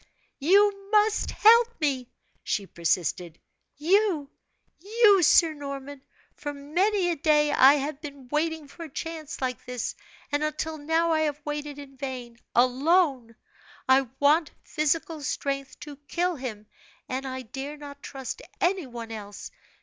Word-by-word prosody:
"You 395 +5 +3
must 430 0 +3
help 470 +1 +5
me!" 265 -5 -1 0.3
she 200 - -2
persisted. 170 -1 -2 0.4
"You 335 -2 +2 0.5
you, 410 +1 +4
Sir 325 0 +5
Norman! 280 -1 -7 0.3
For 290 -1 -6
many 350 +6 +1
a - - -1
day 300 0 +3
I 275 0 +7
have 290 +1 -3
been 280 -4 -9
waiting 310 +1 -1
for 335 +4 -9
a - - -10
chance 315 0 -6
like 255 -1 -2
this, 250 -2 -4 0.4
and 290 +1 0
until 305 +1 -3
now 325 +3 +1
I 320 - +2
have 300 -2 -1
waited 295 -1 -4
in 275 -2 -11
vain. 250 -3 -6 0.2
Alone, 260 -1 +2 0.5
I 265 0 +4
want 300 +2 +4
physical 310 +1 -1
strength 275 -1 -3
to 295 -2 -9
kill 355 +3 0
him, 235 -6 -6 0.4
and 265 +1 -3
I 260 0 -5
dare 275 +5 -7
not 285 -1 -10
trust 270 - -6 0.2
any 360 -4 +1
one 235 -2 -8
else. 205 -2 -8
290 Hz, 140 wpm, -26 LUFS, 265-330 Hz, 0.5 s, I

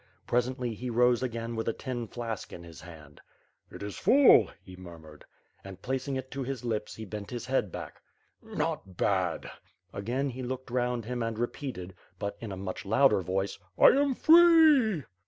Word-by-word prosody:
Presently 125 0 -1
he 125 +3 -6
rose 120 0 +3
again 115 -2 -4
with 110 - -3
a 115 - +1
tin 120 -3 -5
flask 115 -2 -6
in 85 - -9
his 85 -1 -12
hand. 75 -5 -13 0.5
"It - - -9
is 100 -1 -6
full,"" 275 +1 +6
he 95 -2 -12
murmured. 80 -4 -13 0.4
And, 95 -1 -10
placing 135 +1 -2
it 130 0 -5
to 135 - -4
his 130 -1 -5
lips, 110 -3 -3
he 110 - -8
bent 100 +1 -7
his 120 -2 -5
head 130 -7 0
back. - - -8 0.4
"Not 95 -2 -4
bad!" 95 -4 0 0.4
Again, 125 +7 -2
he 130 +2 -7
looked 130 0 -5
round 125 -2 -1
him 125 +1 -4
and 115 -1 -3
repeated, 120 -6 -5 0.2
but 100 +2 -4
in 115 -3 -6
a 95 - -6
much 95 0 -5
louder 130 +1 +3
voice: 95 +3 -2 0.2
"I - - +8
am 280 -1 +2
free!'' 315 - +6
120 Hz, 175 wpm, -29 LUFS, 95-130 Hz, 0.5 s, I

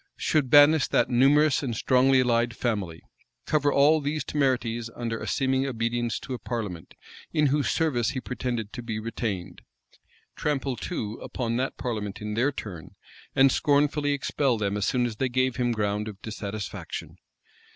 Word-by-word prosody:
Should 150 -5 +1
banish 145 +1 +7
that - - +1
numerous 140 +4 +4
and 125 -5 -3
strongly 130 +2 +4
allied 120 -1 +1
family? 100 -9 -3 0.4
Cover 145 -2 +2
all 150 +3 +4
these 145 +1 -2
temerities 125 -5 0
under 115 -2 -3
a - - -5
seeming 130 0 +1
obedience 120 -1 -1
to 130 - -6
a 125 - -4
parliament, 105 -9 -5 0.4
in 150 -2 +3
whose 145 -1 +1
service 125 -9 +1
he 140 - -3
pretended 120 -3 -4
to 125 - -5
be 115 -2 -4
retained? 110 -4 -4 0.7
Trample, 140 -3 -1
too, 115 - -4
upon 115 -2 -3
that 130 +2 -2
parliament 105 -5 -4
in 105 0 -4
their 125 +6 +2
turn, 95 - -8 0.4
and 135 0 +6
scornfully 145 0 +2
expel 135 -2 0
them 100 -1 -1
as 105 -1 0
soon 125 -1 +1
as 115 -3 -4
they 130 +2 0
gave 130 0 0
him 120 -1 +1
ground 105 -1 -1
of 100 -3 -8
dissatisfaction? 105 -1 -6
125 Hz, 160 wpm, -26 LUFS, 110-140 Hz, 0.7 s, banish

